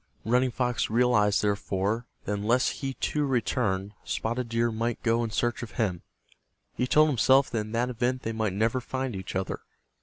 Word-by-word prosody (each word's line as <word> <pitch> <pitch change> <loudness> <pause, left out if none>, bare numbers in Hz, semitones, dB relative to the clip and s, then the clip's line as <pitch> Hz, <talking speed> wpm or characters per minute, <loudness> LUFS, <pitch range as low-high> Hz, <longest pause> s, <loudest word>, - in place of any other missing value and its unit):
Running 125 +3 +3
Fox 125 0 -1
realized, 110 -3 +3
therefore, 100 +2 -1 0.2
that 105 - -1
unless 115 +5 +2
he, 135 -2 -3
too, 150 - -1
returned, 105 -6 0
Spotted 120 +1 -2
Deer 115 0 +1
might 115 +1 -2
go 115 0 +2
in 115 - -2
search 120 +2 -1
of 120 - -7
him. 95 -8 -1 0.7
He 125 - -1
told 155 +4 +5
himself 135 +1 +4
that 115 - 0
in 105 0 -5
that 120 +2 0
event 125 +2 -1
they 115 - -2
might 110 -3 -1
never 115 +5 +1
find 130 -2 -3
each 95 0 -6
other. 95 0 -2
115 Hz, 180 wpm, -27 LUFS, 105-125 Hz, 0.7 s, told